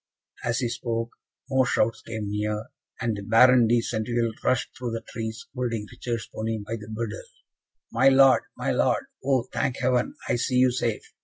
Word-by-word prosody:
As 120 0 0
he 125 -2 0
spoke, 115 0 -3 0.4
more 130 -2 +2
shouts 115 +1 +1
came 110 -3 -5
near; 105 +1 -2 0.3
and 115 -2 0
the 100 - -6
Baron 120 +3 +6
de 120 +1 +3
Centeville 115 +1 -1
rushed 130 0 0
through 120 -2 -4
the 115 - -4
trees 110 0 -5
holding 120 -5 -2
Richard's 115 -2 -4
pony 110 0 -2
by 110 +2 -5
the 105 -1 -10
bridle. 110 -1 -4 0.7
"My 130 +4 +5
Lord, 135 0 +6 0.2
my - - -1
Lord! - - +1 0.2
oh, 130 -2 +2
thank 130 -1 0
Heaven, 125 -1 +1
I - - +1
see 125 +2 -1
you 125 0 +5
safe!" 120 -3 -2
115 Hz, 175 wpm, -26 LUFS, 110-125 Hz, 0.7 s, Baron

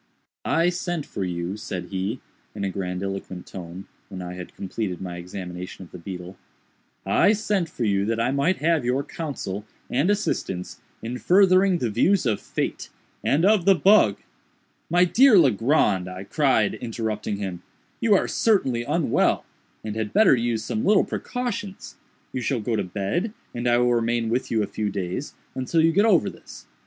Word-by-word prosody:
"I 165 +2 +3
sent 175 -3 -3
for 100 - -4
you," 90 +1 -3
said 90 -4 -6
he, 100 +6 -3 0.3
in 100 - -4
a 100 - -1
grandiloquent 95 0 -4
tone, 90 +1 -8 0.2
when 95 - -7
I 90 0 -6
had 90 -1 -9
completed 95 -2 -4
my 90 -2 -6
examination 90 +1 -7
of - - -20
the 90 - -9
beetle, 90 +1 -8 0.7
"I 210 - +4
sent 205 -5 -1
for 125 - -4
you, 100 -2 +2
that 115 +1 -1
I 115 +3 +1
might 140 +7 +1
have 160 -2 +1
your 125 +3 0
counsel 130 - -5 0.3
and 140 +9 +2
assistance 145 - -2 0.2
in 120 +2 -4
furthering 185 0 +4
the 120 -8 -1
views 175 - +2
of 110 -4 0
Fate - - -3 0.3
and 155 +6 +2
of 205 -4 +4
the 195 - +6
bug—" 180 - +5 0.7
"My 175 +2 +5
dear 240 +4 +6
Legrand," 115 - +3
I 90 +1 -7
cried, 130 -3 +2
interrupting 110 -3 -3
him, 95 -3 -5 0.4
"you 225 -3 +4
are - - +2
certainly 135 - +2
unwell, 145 +1 +1 0.4
and 110 -1 -4
had 110 -1 -3
better 210 -9 +6
use 115 -2 -1
some 110 0 -2
little 205 0 +5
precautions. 230 -6 -5 0.4
You 130 - -2
shall 125 +1 0
go 110 +1 -1
to - - 0
bed, 100 - -2 0.2
and 120 +1 -3
I 120 0 +4
will 120 0 +3
remain 115 -1 0
with 120 +3 -1
you 110 -2 +1
a - - 0
few 105 -1 -3
days, 95 +7 -4 0.2
until 130 +5 0
you 165 +1 +5
get 200 +6 +3
over 195 -8 +4
this. - - -10
115 Hz, 175 wpm, -24 LUFS, -, 0.7 s, the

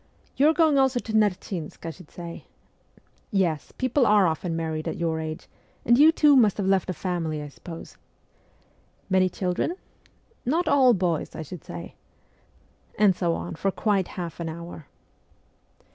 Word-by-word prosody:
You 290 +3 +5
are - - +4
going 315 -4 +4
also 265 -2 +3
to 220 - -7
Nerchinsk, 185 -6 -1
I 165 - -3
should 170 -1 -15
say? 170 -1 -9 0.8
Yes, 175 - 0
people 255 0 +2
are 210 -2 +5
often 165 0 -1
married 160 -1 -3
at - - -3
your 165 -2 -1
age; 155 0 -6 0.4
and 240 - +5
you, 300 +5 +7
too, 300 -3 +5
must 220 -7 +4
have 200 - -1
left 190 -1 +2
a - - 0
family, 170 -4 -3
I 150 0 -6
suppose? 165 +3 -10 1.1
Many 185 -1 +4
children? 185 - -2 0.7
Not 325 +8 0
all 260 -4 +5
boys, 175 -4 -1
I 160 - -5
should 160 +1 -9
say? 85 -1 -8 0.5
' 70 +2 -33
And 200 -3 +4
so 170 -2 0
on 175 - -5
for 195 +4 -1
quite 195 -1 0
half 170 -3 -5
an 165 -1 -3
hour. 170 -2 -9
185 Hz, 165 wpm, -25 LUFS, 165-220 Hz, 1.1 s, you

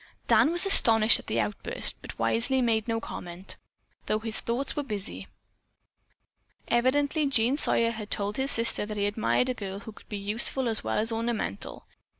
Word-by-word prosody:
Dan - - +4
was 350 +3 +3
astonished 225 - +7
at - - -14
the - - -1
outburst, - - -1
but - - -10
wisely 255 +3 0
made 225 -3 0
no 225 -1 -1
comment, 180 -3 -7 0.5
though 215 - 0
his 220 0 -2
thoughts 245 +4 -3
were 295 - -1
busy. 210 -7 -5 1.4
Evidently 285 +5 +1
Jean 255 -1 +1
Sawyer 230 -5 +2
had 215 -2 -8
told 205 0 -1
his 265 +1 0
sister 230 -4 +5
that 210 -1 -6
he 200 - 0
admired 215 +4 0
a - - 0
girl 200 -3 -7
who 220 - -10
could - - -19
be 210 - -5
useful 220 +6 -1
as 225 -2 -2
well - - -2
as 225 +2 0
ornamental. 225 - -4
230 Hz, 175 wpm, -26 LUFS, 210-255 Hz, 1.4 s, astonished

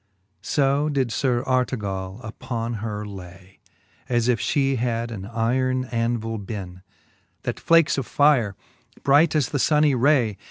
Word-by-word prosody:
So 140 +1 +1
did 135 -5 0
Sir 125 0 0
Artegall 105 -6 -2
upon 115 +2 -4
her 105 -1 -4
lay, 95 -1 -11 0.3
> - - -34
As 120 0 +1
if 125 -2 +2
flie 135 -2 +1
had 120 -1 -1
an 100 -2 -7
yron 130 +3 0
andvile 115 -2 -2
beenc. 95 -3 -7 0.6
That - - -3
flakes 165 -3 +3
of 130 - -5
fire, 135 -9 +3 0.5
bright 145 +4 +4
as 145 -6 +1
the 145 - -2
funny 150 +1 +3
ray. 125 -6 +2
120 Hz, 145 wpm, -23 LUFS, 105-135 Hz, 0.6 s, bright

